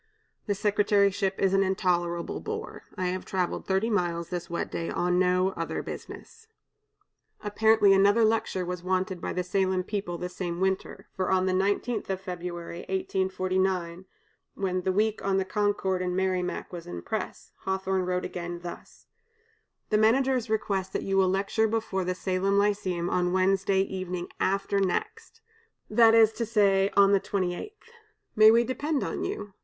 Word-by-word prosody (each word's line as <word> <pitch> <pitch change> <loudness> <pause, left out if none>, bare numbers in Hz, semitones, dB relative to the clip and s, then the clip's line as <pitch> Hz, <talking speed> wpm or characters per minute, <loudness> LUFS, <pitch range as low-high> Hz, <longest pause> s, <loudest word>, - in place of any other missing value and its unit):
"This 200 -2 -1
secretaryship 200 -2 +2
is 195 -1 +2
an 195 - +4
intolerable 175 -3 0
bore. 440 +2 -6 0.2
I 185 -1 0
have 185 +1 -3
traveled 185 -2 -2
thirty 190 +3 +1
miles, 170 -4 -1
this 175 -1 -5
wet 170 - -3
day, 165 - -3
on 180 0 +1
no 185 0 +3
other 165 -3 -4
business." 450 0 -9 1.0
Apparently 210 -1 +4
another 200 +4 +4
lecture 215 -4 0
was 180 0 -4
wanted 185 0 -1
by - - -3
the 180 - -2
Salem 185 0 0
people 195 -3 -4
the 180 - -4
same 180 -1 -5
winter, 190 0 -2
for 185 -1 -1
on 185 -1 +2
the 185 - +1
19th 205 +5 0
of 190 -1 -1
February, 175 -2 -6
1849, 185 -2 -1 0.5
when 185 -2 -1
the 190 - 0
"Week 215 +3 0
on 195 -1 +1
the 190 - 0
Concord 195 -2 0
and 180 0 -2
Merrimac" 185 -1 -1
was 170 -1 -7
in 85 -1 -7
press, - - -5
Hawthorne 190 -1 -1
wrote 180 0 -1
again, 175 -1 -5
thus: 175 - -10 0.9
"The 210 - +4
managers 250 +2 +2
request 195 -3 -1
that - - -2
you 195 - -1
will 190 -1 +4
lecture 195 +4 +1
before 215 -4 -1
the 185 0 -1
Salem 190 +2 0
Lyceum 200 -4 0
on 180 0 0
Wednesday 190 +1 +2
evening 185 -2 -4
after 195 +1 0
next, 190 -2 -3 0.5
that 230 -1 +6
is 225 -1 +6
to 230 - -2
say, 200 -3 +3
on 200 0 +6
the 200 - +5
28th 185 -3 -2
inst. 430 +2 -19 0.4
May 215 0 +8
we 230 +2 +5
depend 285 +4 -2
on - - -3
you? 205 - -5
190 Hz, 165 wpm, -27 LUFS, 180-205 Hz, 1.0 s, May